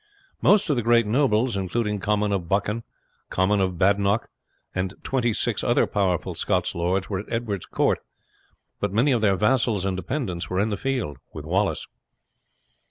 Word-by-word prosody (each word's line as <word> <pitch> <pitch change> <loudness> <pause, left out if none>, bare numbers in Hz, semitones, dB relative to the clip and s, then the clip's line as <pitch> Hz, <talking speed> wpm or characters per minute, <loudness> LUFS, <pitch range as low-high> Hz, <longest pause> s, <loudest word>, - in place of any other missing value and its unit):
Most 205 -1 +4
of - - +2
the 120 - 0
great 115 0 +4
nobles, 120 -1 +2
including 105 +2 -1
Comyn 105 +1 0
of 90 -4 -2
Buchan, 105 +3 0 0.5
Comyn 95 +2 +2
of 95 -2 0
Badenoch, 100 +3 +2 0.4
and 95 +1 -2
twenty 125 -3 0
six - - -1
other - - +3
powerful 95 -4 0
Scottish - - 0
lords, 90 +3 0
were 95 -3 -2
at 100 - -9
Edward's 110 -5 -2
court, - - +1 0.8
but - - -1
many 120 +8 +3
of 120 -3 +2
their 100 -3 +3
vassals 105 -2 +2
and 95 -1 0
dependants 95 - -3
were 90 - -1
in 105 +2 +1
the - - 0
field 125 - -2 0.2
with 75 -1 -7
Wallace. 95 +5 0
100 Hz, 165 wpm, -24 LUFS, 95-115 Hz, 0.8 s, Most